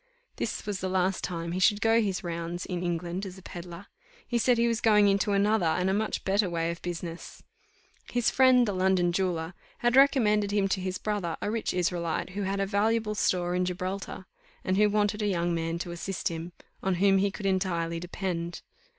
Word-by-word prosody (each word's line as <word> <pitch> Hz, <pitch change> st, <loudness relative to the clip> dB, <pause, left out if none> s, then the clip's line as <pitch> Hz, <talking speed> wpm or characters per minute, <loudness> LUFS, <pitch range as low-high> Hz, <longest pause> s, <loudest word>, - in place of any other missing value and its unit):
This -, -, -3 dB
was 205 Hz, -2 st, -3 dB
the 190 Hz, -, -2 dB
last 185 Hz, 0 st, 0 dB
time 170 Hz, -2 st, -3 dB
he 180 Hz, -, -2 dB
should 205 Hz, +2 st, +4 dB
go 225 Hz, +2 st, +4 dB
his 195 Hz, -4 st, -2 dB
rounds 170 Hz, 0 st, -4 dB
in 180 Hz, -2 st, -3 dB
England 175 Hz, +1 st, -2 dB
as 190 Hz, -1 st, -7 dB
a 190 Hz, -, -14 dB
pedlar; 175 Hz, +1 st, -9 dB, 0.4 s
he 240 Hz, -, 0 dB
said 245 Hz, +1 st, +3 dB
he 235 Hz, 0 st, +3 dB
was 230 Hz, 0 st, 0 dB
going 210 Hz, -2 st, +5 dB
into 200 Hz, +1 st, +2 dB
another 205 Hz, +1 st, +2 dB
and 180 Hz, +4 st, +1 dB
a -, -, +1 dB
much 215 Hz, +2 st, -2 dB
better 195 Hz, 0 st, +2 dB
way 165 Hz, -1 st, -1 dB
of 170 Hz, -, -8 dB
business. 170 Hz, -1 st, -6 dB, 0.7 s
His 245 Hz, -1 st, +2 dB
friend, 255 Hz, -2 st, +5 dB
the 205 Hz, -, -1 dB
London 185 Hz, -1 st, +2 dB
jeweller, 175 Hz, -2 st, -1 dB, 0.2 s
had 240 Hz, +1 st, +1 dB
recommended 220 Hz, -7 st, +4 dB
him 200 Hz, -1 st, +1 dB
to 190 Hz, -1 st, 0 dB
his 185 Hz, 0 st, -3 dB
brother, 200 Hz, -6 st, -2 dB
a 205 Hz, -, -2 dB
rich 225 Hz, 0 st, -1 dB
Israelite, 175 Hz, -1 st, -1 dB
who 200 Hz, +2 st, -4 dB
had 195 Hz, 0 st, -1 dB
a 195 Hz, -, +1 dB
valuable 215 Hz, +2 st, +1 dB
store 180 Hz, -4 st, 0 dB
in 180 Hz, 0 st, +1 dB
Gibraltar, 185 Hz, +1 st, -4 dB, 0.4 s
and 185 Hz, -, 0 dB
who 210 Hz, +1 st, +4 dB
wanted 210 Hz, 0 st, +1 dB
a 210 Hz, -, +1 dB
young 175 Hz, -3 st, 0 dB
man 165 Hz, 0 st, -2 dB
to 175 Hz, 0 st, -5 dB
assist 175 Hz, +2 st, -3 dB
him, 165 Hz, +1 st, -6 dB, 0.3 s
on 190 Hz, -1 st, 0 dB
whom 195 Hz, +1 st, +4 dB
he 200 Hz, +1 st, +2 dB
could 195 Hz, +1 st, -8 dB
entirely 175 Hz, -3 st, 0 dB
depend. 175 Hz, -1 st, -4 dB
190 Hz, 205 wpm, -28 LUFS, 175-205 Hz, 0.7 s, going